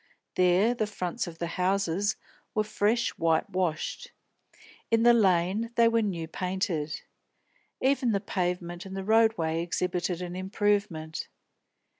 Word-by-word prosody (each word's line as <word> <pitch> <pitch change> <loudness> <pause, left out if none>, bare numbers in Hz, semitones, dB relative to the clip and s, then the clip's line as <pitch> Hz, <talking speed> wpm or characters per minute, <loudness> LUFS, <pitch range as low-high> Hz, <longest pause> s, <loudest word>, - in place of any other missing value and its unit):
There 185 +6 +4
the 220 -3 -1
fronts 180 -5 -3
of 165 -1 -8
the 170 - -2 0.2
houses 195 +1 +1 0.4
were 215 - +3
fresh 215 +2 +1
white 165 -1 +2
washed; 185 - -2 0.8
in 230 0 +3
the 240 0 +7
Lane 195 +1 +2
they 230 0 +5
were 230 0 +3
new 175 -6 -2
painted. 180 -4 -2 0.8
Even 260 -2 +2
the 200 - +1
pavement 180 -3 -3
and 195 0 -7
the 195 - -3
road 220 +2 +4
way 160 0 0
exhibited 175 0 -1
an 175 0 -6
improvement. 190 -5 -1
190 Hz, 135 wpm, -28 LUFS, 175-215 Hz, 0.8 s, the